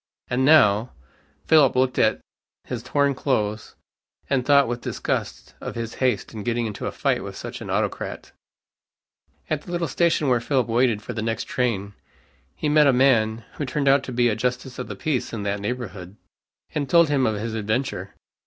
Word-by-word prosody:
And, 125 +1 +1
now! 120 -6 +5 0.5
Philip 145 -5 +5
looked 130 0 +1
at - - +2 0.4
his 125 -2 -5
torn 140 +2 +1
clothes, 110 -6 -2 0.6
and 135 -2 +2
thought 140 +1 +5
with 120 0 -3
disgust - - -3
of - - -6
his 115 -1 -4
haste 125 -6 0
in 110 - -6
getting 120 +2 -1
into 105 -2 -4
a - - -2
fight - - 0
with - - -7
such - - -7
an - - -7
autocrat. - - -3 1.2
At 155 -2 -1
the 175 - -10
little 170 -1 -1
station 170 -3 +1
where 125 -3 +2
Philip 130 0 +1
waited 115 -2 +1
for 120 - -6
the 110 - -3
next 115 0 -2
train, 115 - -2 0.6
he - - -2
met 150 0 +5
a - - +6
man 115 -4 +3
who 145 - -2
turned 140 +1 -1
out 135 0 +5
to - - -6
be 120 0 +2
a 110 - +1
justice 125 +2 -3
of 125 - -4
the - - -6
peace 145 -7 -2
in 110 -3 -4
that 100 0 -1
neighborhood, 100 -5 -5 0.6
and 145 -3 -2
told 170 -2 +5
him 140 -3 +2
his 110 0 -2
adventure. 110 +5 -2
125 Hz, 185 wpm, -23 LUFS, 110-140 Hz, 1.2 s, a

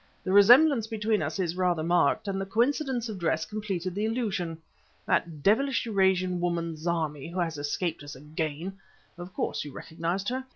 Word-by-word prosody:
The 185 - -2
resemblance 240 +5 +6
between 220 -1 0
us - - -3
is 175 -3 -1
rather 180 -3 +1
marked 175 +4 +2
and 195 -1 -2
the - - -2
coincidence 245 +2 0
of 210 -4 -6
dress 160 -1 0
completed 190 -3 -4
the 205 +3 -1
illusion. 205 -8 -2 0.5
That 155 -4 -1
devilish 260 - +2
Eurasian 190 -4 +2
woman, 170 -2 -1
Zarmi, 155 -3 -2
who 180 - -7
has 165 -2 -1
escaped 160 +3 -2
us 145 -1 -9
again 155 +6 -5 0.4
of 175 +1 -8
course - - -2
you 145 - -8
recognized 170 - -3
her? 260 +1 -3
185 Hz, 170 wpm, -28 LUFS, 165-215 Hz, 0.5 s, resemblance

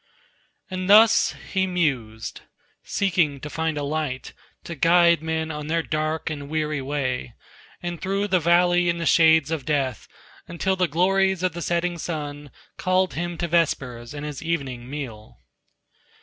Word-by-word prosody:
And 185 0 -3
thus 220 +2 +6 0.2
he 190 -1 +2
mused, 130 -12 -2 0.4
seeking 170 -8 0
to 150 +3 -8
find 160 0 -2
a 145 - -2
light 145 -3 -3 0.3
To 170 - -6
guide 170 +1 +4
men 160 0 -2
on 150 -1 -6
their 165 +1 0
dark 155 +1 -2
and 145 -2 -6
weary 155 -2 -1
way, 130 -4 -3 0.5
And 175 -1 -4
through 195 +2 -1
the 185 -1 +3
valley 175 +1 +3
and 170 0 -1
the 170 - -2
shades 160 -1 +5
of 160 -4 -2
death, 135 -6 -1 0.4
Until 190 +3 -1
the 185 -1 +1
glories 190 +3 +2
of 185 -2 +1
the 175 - -6
setting 170 0 -1
sun 145 -3 -5 0.3
Called 185 0 +1
him 175 +1 -3
to 170 - -2
vespers 135 -7 -1
and 145 0 -5
his 150 -3 -6
evening 135 -7 -3
meal. 120 - -7
160 Hz, 155 wpm, -24 LUFS, 145-175 Hz, 0.5 s, thus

